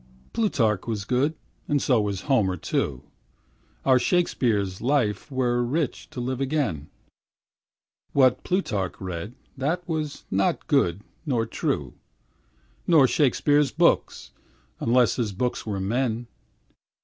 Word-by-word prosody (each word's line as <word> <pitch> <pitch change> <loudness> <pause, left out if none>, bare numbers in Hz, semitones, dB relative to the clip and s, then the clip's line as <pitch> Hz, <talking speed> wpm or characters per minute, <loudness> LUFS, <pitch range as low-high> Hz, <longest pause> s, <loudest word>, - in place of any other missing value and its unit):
Plutarch 115 - +1
was 105 -4 -3
good, 130 +7 +1 0.3
and 145 - +2
so 125 -5 +2
was 100 -2 -2
Homer 105 -9 +1
too, 70 -4 -2 0.8
Our 130 -1 +5
Shakespeare's 115 - +1
life 120 -4 0
were 120 -2 +1
rich 145 +4 -2
to - - -7
live 130 +2 -2
again, 130 - -1 1.2
What 130 -3 +3
Plutarch 105 - -1
read, 95 +4 -5 0.2
that 160 +7 -2
was 155 -3 -3
not 95 +1 +1
good 90 +4 +1 0.2
nor 125 -8 0
true, - - -2 0.9
Nor 155 -6 +6
Shakespeare's 145 +1 +3
books, - - +1 0.5
unless 120 0 +3
his 110 -5 -1
books 125 +3 -2
were 100 -2 -2
men. 115 +3 -1
125 Hz, 115 wpm, -25 LUFS, 105-140 Hz, 1.2 s, Nor